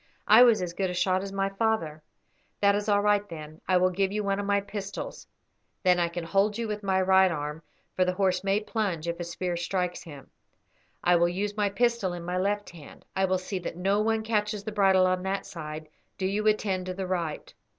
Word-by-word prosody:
"I 220 +3 +8
was 235 -6 +6
as 175 -1 -4
good 190 +1 -1
a 180 - -4
shot 185 +1 +1
as 195 0 -6
my 195 0 0
father." 195 -7 -1 0.6
"That 200 0 +4
is 205 +1 -1
all 205 0 +4
right, 205 0 +2
then. 155 -1 -9
I 185 - +4
will 185 +1 +3
give 190 +1 0
you 210 +1 -1
one 200 0 0
of 200 - -3
my 200 0 +3
pistols; 200 - -6 0.6
then 180 -2 +4
I 170 - +2
can 170 0 -5
hold 200 +5 +1
you 230 -1 -2
with 210 -1 -4
my 190 -2 +1
right 190 0 +5
arm, 150 0 -4 0.3
for 185 - +3
the 180 0 0
horse 185 -1 +1
may 195 +2 +1
plunge 200 -7 -2
if 170 0 -3
a - - -2
spear 175 +1 -3
strikes 180 +1 -2
him. 145 -5 -12 0.7
I 175 - +4
will 170 0 +3
use 200 +3 -3
my 205 -1 +1
pistol 235 -2 0
in 175 -1 -7
my 180 +1 -1
left 205 +2 -1
hand. 160 -4 -14
I 190 0 +2
will 185 0 +1
see 185 +1 -4
that 170 -1 -6
no 195 +3 +1
one 220 0 +1
catches 210 -2 -1
the 215 - -4
bridle 195 -3 +4
on 185 0 +1
that 190 +1 -2
side; 155 -2 -7 0.3
do 190 - -2
you 205 +3 0
attend 195 -3 +1
to 185 - -4
the 190 0 -3
right. 170 -4 -3
190 Hz, 230 wpm, -27 LUFS, 180-205 Hz, 0.7 s, I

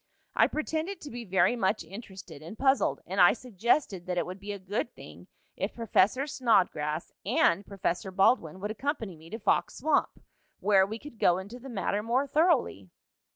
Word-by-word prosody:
"I - - +5
pretended 320 +5 -3
to 290 - -8
be 240 0 -7
very 190 +5 +3
much 205 -3 0
interested 190 -4 -10
and 170 +8 -9
puzzled, 270 0 +2
and 190 +1 0
I 175 - +8
suggested 235 - -1
that 180 -1 -2
it - - +1
would 185 +2 -7
be 205 +1 -6
a 200 - -4
good 200 +5 -4
thing - - -13 0.3
if - - -3
Professor 230 +3 +2
Snodgrass 185 - +1
and 180 +4 +2
Professor 190 -1 -2
Baldwin 185 -3 +2
would 210 +1 -3
accompany 225 - -3
me 160 +1 -15
to 220 - -5
Fox 220 - +1
Swamp, 305 +1 +1 0.4
where 195 -2 +4
we 220 +2 -5
could 265 -2 -12
go 175 - +4
into 200 +6 -8
the 270 +2 -10
matter 205 -2 -1
more 240 +5 +1
thoroughly." 285 - +1
205 Hz, 180 wpm, -29 LUFS, 185-250 Hz, 0.4 s, I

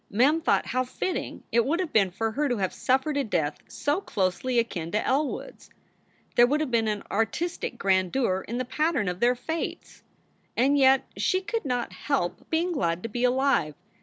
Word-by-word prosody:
Mem 280 +10 +3
thought 325 - +2
how 255 +1 0
fitting 350 +8 -4
it 235 0 +4
would 315 +8 0
have 365 -4 -3
been 200 -4 +4
for 225 +5 -2
her 285 +5 0
to 245 - 0
have 190 -2 -1
suffered 265 +3 +1
a 280 - +2
death 165 - -1
so 290 +6 -1
closely 205 - -1
akin 190 -8 -1
to 210 +4 -1
El 285 +3 +2
wood - - -6
s. - - -18 0.7
There 240 0 +7
would 295 +4 +1
have 305 -4 -2
been 225 -2 +2
an 210 -1 -2
artistic 240 - -1
grandeur 190 +1 +1
in 235 - -3
the 255 - -1
pattern 290 - 0
of 180 0 -2
their 245 +3 +3
fates. 320 +7 -5 0.6
And 270 +4 +4
yet 270 -1 +5
she 370 - +2
could 420 +1 -3
not 245 -3 -2
help 275 -12 -2
being 335 +3 +1
glad 170 - -1
to 230 - -4
be 240 +3 -3
alive. 250 - +2
245 Hz, 195 wpm, -26 LUFS, 205-290 Hz, 0.7 s, There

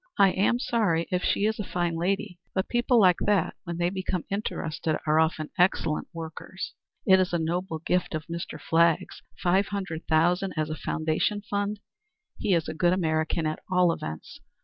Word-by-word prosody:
"I 195 -2 +6
am 205 +6 +2
sorry 210 -10 +1
if 180 0 0
she 200 - +2
is 220 0 0
a - - -1
fine 175 -3 -1
lady, 180 +1 -1 0.2
but 190 - 0
people 240 0 +3
like 185 -4 +5
that, 195 -4 +2
when 170 0 -4
they 175 +1 +1
become 185 -2 -3
interested, 165 -6 -2
are 155 0 +3
often 160 -1 0
excellent 175 -4 +2
workers. 165 +2 -7 0.3
It 190 -1 +6
is 185 -1 0
a - - +3
noble 170 +1 -2
gift 175 +1 -1
of 155 0 -4
Mr. 170 0 -6
Flagg's 165 -1 +2 0.2
$500,000 180 -1 +1
as 155 0 -1
a - - -2
foundation 160 +7 -1
fund. 205 0 -2 0.6
He's 170 -6 +1
a - - -3
good 175 +2 +2
American 160 -2 0
at 155 0 -2
all 180 -2 +4
events. 80 - -7
175 Hz, 170 wpm, -27 LUFS, 160-195 Hz, 0.6 s, I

